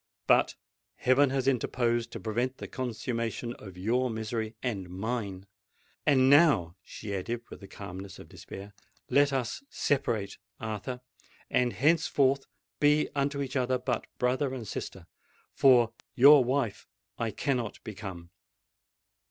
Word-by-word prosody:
But - - +4 0.4
heaven 130 +2 +4
has 135 0 -1
interposed 120 -2 +1
to - - -5
prevent 120 +4 -2
the - - -7
consummation 120 -1 -3
of 95 -3 -11
your 120 +7 +1
misery—and 110 -3 -3
mine! 100 0 -4 0.6
And 130 -2 +5
now," 135 - +5
she 100 +1 -7
added, 115 +5 -3
with - - -9
the 100 - -11
calmness 95 -1 -8
of - - -12
despair, 100 +1 -10 0.4
"let 140 0 +5
us 130 - -2
separate, 120 -8 -1 0.2
Arthur—and 125 +2 -4
henceforth 140 -3 +2 0.3
be 150 +1 +4
unto 140 0 0
each 135 0 -6
other 130 -1 +1
but 125 0 -2
brother 130 +2 0
and 120 -4 -6
sister;—for 115 +7 0 0.2
your 140 +1 +8
wife 125 -4 -1 0.3
I 115 - 0
cannot 120 0 -2
become!" 95 -5 -8
120 Hz, 120 wpm, -29 LUFS, 105-135 Hz, 0.6 s, your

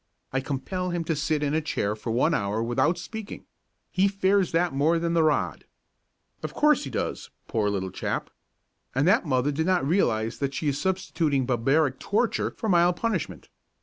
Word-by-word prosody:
I 135 - +2
compel 145 +8 -3
him 175 -1 -2
to 160 0 -1
sit 150 +1 0
in 145 0 0
a 160 - +2
chair 105 -8 -1
for 110 +2 -7
one 125 +8 +2
hour 105 -2 0
without 130 +8 +1
speaking. 215 +4 -7 0.5
He 190 +2 +3
fears 195 -1 +2
that 170 -1 +1
more 150 +5 +2
than 170 0 -1
the 165 - +3
rod." 155 -2 0 0.8
Of - - -6
course, 300 - +3
he - - -5
does, 120 - -3 0.2
poor 105 -2 0
little 95 -2 -2
chap! - - -3 0.6
And 140 +5 +2
that 190 -3 +3
mother 130 +1 +1
did 160 +4 -1
not 180 -7 +2
realise 115 - +1
that 140 -1 -2
she - - -3
was 145 -1 0
substituting 165 -7 0
a - - -3
barbaric 135 +3 +1
torture 215 +3 0
for 220 - -3
mild 175 -2 +4
punishment. 210 -5 -3
155 Hz, 185 wpm, -26 LUFS, 130-180 Hz, 0.8 s, mild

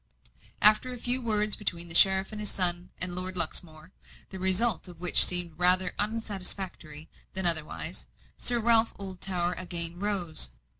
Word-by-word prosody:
After 215 +4 +6
a 250 - -9
few 245 +2 -3
words 210 -3 0
between 175 -5 -5
the 165 - -7
sheriff, 190 +2 +4
his 210 -1 -6
son, 175 -1 +3
and 180 0 +1
Lord 185 +1 -6
Luxmore, 160 0 -3 0.4
the 190 - -9
result 190 +2 0
of 175 -2 -15
which 180 0 +7
seemed 175 -3 +1
rather 180 +1 +2
unsatisfactory 190 -7 -5 0.3
than 190 -1 -2
otherwise, 160 -3 0 0.3
Sir 240 -1 +2
Ralph 230 0 +1
Oldtower 185 -2 -5
again 175 -1 -4
rose. 185 - -1
185 Hz, 145 wpm, -25 LUFS, 175-210 Hz, 0.4 s, which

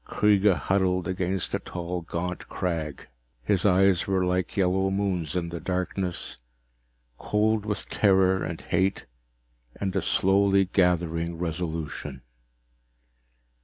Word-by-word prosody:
Kreega 105 +2 +3
huddled 90 -1 0
against 95 0 -1
a - - +1
tall 90 0 -5
gaunt 85 +2 -5
crag. 80 -5 -3 0.4
His 100 +4 +2
eyes 95 -1 +3
were 95 -1 +1
like 90 +1 -1
yellow 95 0 +2
moons 95 -5 -1
in 85 -2 -1
the 85 0 -5
darkness, 90 -4 -3 0.8
cold 105 0 +1
with 105 -2 -3
terror 95 -2 +3
and 80 0 -4
hate 95 +3 0 0.7
and 95 -2 -3
a - - +2
slowly 100 0 +3
gathering 85 -2 +1
resolution. 80 -5 -4
90 Hz, 115 wpm, -26 LUFS, 85-95 Hz, 0.8 s, Kreega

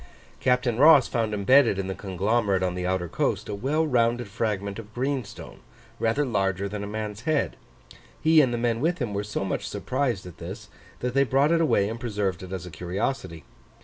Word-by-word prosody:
Captain 125 -2 +1
Ross 150 -2 +7
found 115 -2 -1
embedded 105 +2 +4
in 95 - -2
the 95 - -3
conglomerate 100 +1 0
on 90 -1 0
the 90 0 -3
outer 90 -1 -1
coast, - - -1
a 105 - -4
well 140 +10 0
rounded 120 -4 +1
fragment 100 -1 -2
of 105 -1 -11
greenstone, 130 -4 -4 0.4
rather 115 +6 +1
larger 100 -5 0
than 100 +1 -5
a - - -4
man's 105 0 -5
head: 155 -2 +1 0.6
he 160 0 +5
and 130 -4 +2
the 120 - -1
men 115 0 0
with 170 +4 +1
him 120 -6 -3
were 100 +1 -1
so 105 -1 -3
much 95 - -3
surprised 125 -7 -2
at 90 -2 -11
this, - - -8 0.3
that 125 0 -2
they 135 +1 +4
brought 135 +4 +2
it 165 0 +3
away 100 -11 +3
and 115 +2 -5
preserved 105 -6 -2
it 95 0 -9
as 95 -2 -5
a 90 - -9
curiosity. 90 - -3
110 Hz, 200 wpm, -26 LUFS, 100-130 Hz, 0.6 s, Ross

